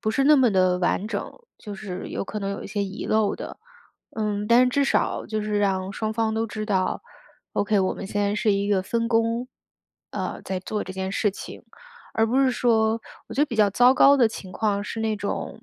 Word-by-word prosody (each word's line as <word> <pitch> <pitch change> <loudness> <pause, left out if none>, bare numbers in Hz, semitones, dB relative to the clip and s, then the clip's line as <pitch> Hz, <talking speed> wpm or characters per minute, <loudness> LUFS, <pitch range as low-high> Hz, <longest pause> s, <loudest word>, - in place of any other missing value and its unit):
不 215 - 0
是 270 +5 +1
那 300 +1 +7
么 260 -4 +4
地 185 -2 +3
完 185 +3 0
整， - - -4 0.3
就 205 -2 -8
是 190 -2 -6 0.2
可 210 - -5
能 195 - -2
有 200 - -5
些 200 0 -2
遗 195 +1 -5
漏 215 -1 +1
的， - - -7 0.6
嗯， 210 -1 -2
但 250 +2 +6
至 280 +2 +2
少 - - 0
就 215 -1 -2
是 210 -1 -1
让 190 -1 0
双 220 +2 -2
方 220 -1 0
都 225 +1 0
知 215 -1 -5
道 190 -3 0 0.5
：“OK， 205 0 +1
我 185 - +1
们 - - -7
现 205 +1 -2
在 205 0 +1
是 215 0 +1
一 200 +1 0
个 195 -2 +2
分 230 +4 -1
工， 230 +1 +1 0.6
呃， - - -4
在 190 -1 -3
做 210 +3 -3
这 185 - -7
件 190 0 -4
事 210 - +1
情”。 - - -9 0.5
而 225 0 +2
不 255 +4 +2
是 265 - +4
说 230 -2 +2 0.3
我 225 - -7
觉 275 - 0
得 300 - +4
比 235 - -5
较 210 -2 +4
糟 245 +5 +5
糕 280 +2 +6
的 245 -4 +5
情 205 -4 -7
况， 205 0 -1
是 225 - -6
那 220 -1 0
种 205 -1 -4
215 Hz, 240 characters per minute, -24 LUFS, 200-230 Hz, 0.6 s, 那